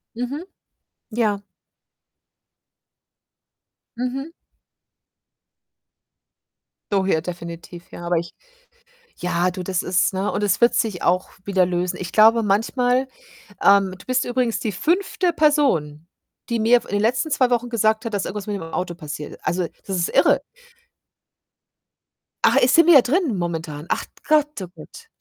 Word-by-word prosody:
Mhm. 260 +8 -4 0.7
Ja. 215 -3 0 2.6
Mhm. 265 +5 -4 2.6
So 195 -1 +2
hier 160 -4 +1
definitiv, 170 0 -8
ja. 175 - -8
Aber 175 0 +1
ich 170 +1 -4 0.9
ja, 180 0 0
du, 185 0 -6
das 185 0 -2
ist 180 +1 +1
ne, 190 +2 -1
und 210 - -2
es 205 +1 +1
wird 235 - +5
sich 220 -9 -1
auch 180 +1 +1 0.2
wieder 190 -2 +2
lösen. 180 0 -2
Ich 180 -1 -5
glaube 225 +1 +5
manchmal, 245 +5 +1 0.6
ähm 195 -1 +4
du - - -16
bist 255 +1 +1
übrigens 245 -2 -1
die 215 - -2
5. 355 - 0
Person, 265 - +1 0.4
die 235 -1 0
mir, 230 +3 +5
f - - -16
in - - -10
den 205 - +1
letzten 245 +7 +1
2 260 -3 +2
Wochen 245 0 0
gesagt 220 -1 +1
hat, 230 -2 -4
dass 200 - -1
irgendwas 205 0 -5
mit 205 -1 -2
dem 195 - -7
Auto 175 +2 -4
passiert. 150 -2 -8
Also, 180 0 0 0.2
das 195 - -2
ist 170 -1 0
irre. - - +4 2.0
Ach, - - +5
äh, - - +5
sind 325 +6 +5
wir 310 -6 +8
drin, 290 - 0
momentan? 165 -3 -4
Ach - - 0 0.2
Gott, 300 -6 +2
Oh - - -6
Gott. 315 - -13
205 Hz, 145 wpm, -22 LUFS, 180-250 Hz, 2.6 s, wir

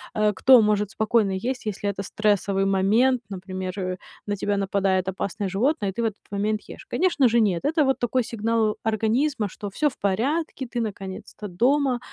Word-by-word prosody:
э, 210 -1 +2
кто 255 +3 +6
может 210 -1 +1
спокойно 220 -2 +1
есть, 240 +6 -3
если 205 -1 -2
это 195 0 -4
стрессовый 205 -1 0
момент, 220 +7 +3
например, 185 -1 -5
э, 185 0 -3 0.3
на 205 - 0
тебя 205 +1 -1
нападает 195 -1 +1
опасное 190 +1 -3
животное, 205 0 0
ты 235 - -3
в - - 0
этот 215 -2 -4
момент 210 +1 -1
ешь. - - -10
Конечно 340 -8 +3
же, 235 0 +3
нет. 185 -5 +1
Это 305 -1 +2
вот 270 - +1
такой 245 +1 +1
сигнал 225 -1 0
организма, 225 +2 +1
что 205 +2 -7
всё 295 +10 0
в 255 - -16
порядке, 265 - -1
ты 240 0 -3
наконец-то 200 0 -6
дома 255 +7 +2
215 Hz, 180 wpm, -24 LUFS, 195-245 Hz, 0.3 s, кто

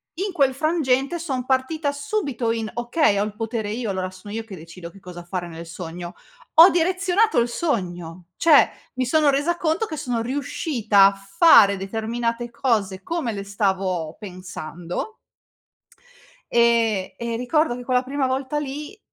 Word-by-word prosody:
in 390 +4 -2
quel 275 -5 +3
frangente 290 0 0
son 265 -6 -3
partita 275 +3 0
subito 285 - -2
in: 225 -1 -2
"Okay, 240 -1 +1
ho 200 - +2
il 210 0 -5
potere 225 -2 -3
io 225 -2 -3
allora, 185 -1 -3
sono 195 +3 -11
io 225 - -3
che 215 -3 -10
decido 170 +1 -10
che 195 - -16
cosa 180 -2 -10
fare 175 0 -4
nel 165 0 -9
sogno." 175 +1 -7 0.4
Ho 335 +4 +10
direzionato 370 - +2
il 235 - +2
sogno, 180 - -3
cioè 320 -3 +6 0.3
mi 255 - 0
sono 300 +3 +3
resa 290 +5 +1
conto 325 +7 0
che 315 - -6
sono 245 -6 -2
riuscita 240 -5 +2
a 200 - +5
fare 200 - +5
determinate 230 +4 -3
cose, 215 -6 0
come 330 - -2
le 200 -2 -5
stavo 190 -5 -1
pensando 180 - -7 1.4
ehm, 230 -5 +2
e 235 -1 -4
ricordo 275 +2 +1
che 245 - -9
quella 250 -1 +2
prima 270 +1 -1
volta 265 +3 -2
lì, 295 +8 -6
235 Hz, 155 wpm, -23 LUFS, 195-290 Hz, 1.4 s, Ho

